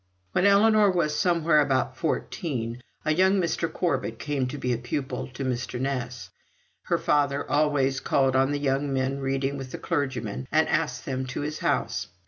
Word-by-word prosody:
When 180 Hz, -, +3 dB
Ellinor 210 Hz, +1 st, +5 dB
was 170 Hz, -5 st, +1 dB
somewhere 165 Hz, -1 st, +3 dB
about 130 Hz, -3 st, +1 dB
fourteen, 125 Hz, -5 st, -3 dB, 0.2 s
a 155 Hz, -, +3 dB
young 190 Hz, +4 st, +4 dB
Mr. 165 Hz, -1 st, -1 dB
Corbet 135 Hz, -10 st, -1 dB
came 140 Hz, -1 st, -1 dB
to 130 Hz, -, -5 dB
be 125 Hz, -3 st, 0 dB
pupil 120 Hz, +3 st, -4 dB
to 130 Hz, +1 st, -6 dB
Mr. 125 Hz, -1 st, -2 dB
Ness. 125 Hz, -2 st, -3 dB, 0.5 s
Her -, -, +1 dB
father 140 Hz, -1 st, +1 dB
always 145 Hz, -2 st, +2 dB
called 135 Hz, -1 st, +2 dB
on 135 Hz, +1 st, +3 dB
the 145 Hz, -, 0 dB
young 140 Hz, 0 st, 0 dB
men 135 Hz, +1 st, 0 dB
reading 135 Hz, +1 st, -1 dB
with 130 Hz, -1 st, -7 dB
the -, -, -5 dB
clergyman, 130 Hz, -, -2 dB
and 155 Hz, +1 st, +3 dB
asked 130 Hz, -6 st, -1 dB
them 130 Hz, -1 st, -3 dB
to 125 Hz, -, -4 dB
his 150 Hz, +1 st, -4 dB
house. -, -, -1 dB
140 Hz, 170 wpm, -26 LUFS, 130-155 Hz, 0.5 s, Ellinor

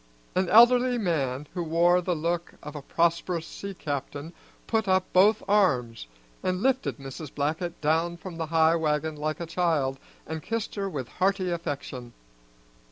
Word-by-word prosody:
An 185 Hz, -1 st, +1 dB
elderly 245 Hz, +2 st, +6 dB
man 150 Hz, -, -1 dB
who 180 Hz, -, -3 dB
wore 170 Hz, +2 st, +3 dB
the 180 Hz, 0 st, -1 dB
look 170 Hz, +2 st, -2 dB
of 150 Hz, -, -8 dB
a 150 Hz, -, -5 dB
prosperous 170 Hz, +2 st, 0 dB
sea 200 Hz, +3 st, -7 dB
captain 145 Hz, +1 st, -5 dB, 0.3 s
put 220 Hz, -3 st, 0 dB
up 185 Hz, 0 st, +3 dB
both 200 Hz, +4 st, +5 dB
arms 125 Hz, -, +2 dB, 0.3 s
and 185 Hz, +1 st, -1 dB
lifted 265 Hz, 0 st, +1 dB
Mrs. 135 Hz, +1 st, -8 dB
Blackett 160 Hz, +4 st, -2 dB
down 165 Hz, +3 st, +1 dB
from 175 Hz, -1 st, -8 dB
the 165 Hz, -1 st, -3 dB
high 160 Hz, +1 st, +4 dB
wagon 155 Hz, -1 st, 0 dB
like 155 Hz, +3 st, -3 dB
a 170 Hz, -, -3 dB
child, 160 Hz, -6 st, 0 dB, 0.3 s
and 160 Hz, 0 st, -5 dB
kissed 225 Hz, +5 st, -3 dB
her 200 Hz, -1 st, -2 dB
with 135 Hz, -8 st, -4 dB
hearty 190 Hz, +2 st, 0 dB
affection. 140 Hz, -7 st, -5 dB
170 Hz, 160 wpm, -27 LUFS, 150-185 Hz, 0.3 s, elderly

